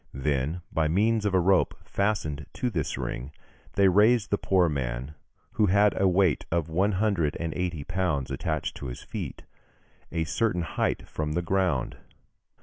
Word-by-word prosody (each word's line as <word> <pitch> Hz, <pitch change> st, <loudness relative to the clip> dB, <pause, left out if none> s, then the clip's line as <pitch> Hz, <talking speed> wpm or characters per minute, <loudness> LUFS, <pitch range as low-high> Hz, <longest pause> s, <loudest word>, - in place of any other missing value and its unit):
Then 70 Hz, +5 st, -1 dB
by 80 Hz, -1 st, +1 dB
means 105 Hz, +5 st, +2 dB
of 95 Hz, -, 0 dB
a -, -, +5 dB
rope 95 Hz, +1 st, +3 dB
fastened 90 Hz, -8 st, -1 dB
to 125 Hz, -, -2 dB
this 80 Hz, -7 st, -2 dB
ring, 65 Hz, +4 st, -4 dB, 0.4 s
they 100 Hz, -1 st, +4 dB
raised 105 Hz, +4 st, +4 dB
the 100 Hz, -, +3 dB
poor 95 Hz, -2 st, +3 dB
man, 65 Hz, -1 st, -3 dB, 0.4 s
who 110 Hz, -2 st, +2 dB
had 100 Hz, +2 st, +4 dB
a 95 Hz, -, +3 dB
weight 90 Hz, -4 st, +3 dB
of 85 Hz, -1 st, 0 dB
one 95 Hz, +6 st, +1 dB
hundred 95 Hz, -7 st, +1 dB
and 80 Hz, -2 st, -2 dB
eighty 90 Hz, -5 st, -2 dB
pounds 85 Hz, -6 st, -1 dB
attached 80 Hz, -3 st, -2 dB
to 70 Hz, -, -6 dB
his -, -, -7 dB
feet, -, -, -6 dB, 0.7 s
a 85 Hz, -1 st, 0 dB
certain 90 Hz, 0 st, 0 dB
height -, -, -2 dB
from 75 Hz, -1 st, -3 dB
the 85 Hz, +2 st, 0 dB
ground. 90 Hz, -8 st, 0 dB
85 Hz, 165 wpm, -27 LUFS, 75-100 Hz, 0.7 s, a